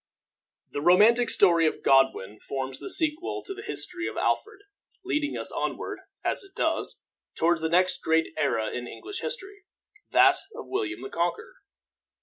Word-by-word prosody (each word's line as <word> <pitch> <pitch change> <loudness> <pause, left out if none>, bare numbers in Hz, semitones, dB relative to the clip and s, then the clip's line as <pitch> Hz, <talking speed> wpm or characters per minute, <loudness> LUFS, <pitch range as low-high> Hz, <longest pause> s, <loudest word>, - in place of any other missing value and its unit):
The 145 - -3
romantic 215 +9 +5
story 170 -4 +4
of - - -3
Godwin 135 -7 +3
forms 135 -1 -5
the - - -7
sequel 320 -1 0
to 390 - -5
the 400 - -9
history 360 -5 -3
of - - -6
Alfred, 430 -2 -1 0.4
leading 300 -6 -1
us - - 0
onward, - - -3 0.2
as - - 0
it 390 0 -18
does, - - -1 0.3
toward 170 +1 +2
the 160 0 -1
next 180 +2 +2
great 160 0 +1
era 135 -8 0
in 125 0 -5
English 395 - -6
history, 405 -2 -4 0.5
that - - +6 0.2
of 465 - -7
William 390 -3 -3
the 400 - -6
Conqueror. 460 +3 -2
235 Hz, 155 wpm, -27 LUFS, -, 0.5 s, that